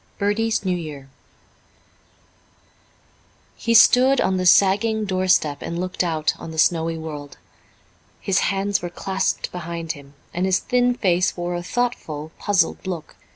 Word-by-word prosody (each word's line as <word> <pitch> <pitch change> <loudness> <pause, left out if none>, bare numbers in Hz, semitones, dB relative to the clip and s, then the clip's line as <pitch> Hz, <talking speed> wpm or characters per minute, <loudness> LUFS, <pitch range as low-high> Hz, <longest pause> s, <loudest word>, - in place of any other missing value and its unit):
Bertie's 215 +1 0
New 185 -1 +1
Year 145 -5 -8 2.4
He 230 0 0
stood 255 +3 +6
on 190 0 +1
the 185 0 +1
sagging 210 +4 +4
doorstep 185 -6 +1
and 170 - -4
looked 185 0 -2
out 160 -3 0
on - - -8
the 160 - -8
snowy 165 0 +2
world. 150 -3 -8 0.8
His 195 - +1
hands 200 +1 0
were 175 - -4
clasped 190 +2 -2
behind 170 -2 -5
him, 140 -2 -12 0.2
and 180 +2 0
his 185 -1 +3
thin 245 0 +1
face 185 -5 +1
wore 175 0 -3
a 175 - -3
thoughtful, 175 -8 -3
puzzled 195 -1 0
look. 175 -4 -6
180 Hz, 140 wpm, -22 LUFS, 165-200 Hz, 2.4 s, stood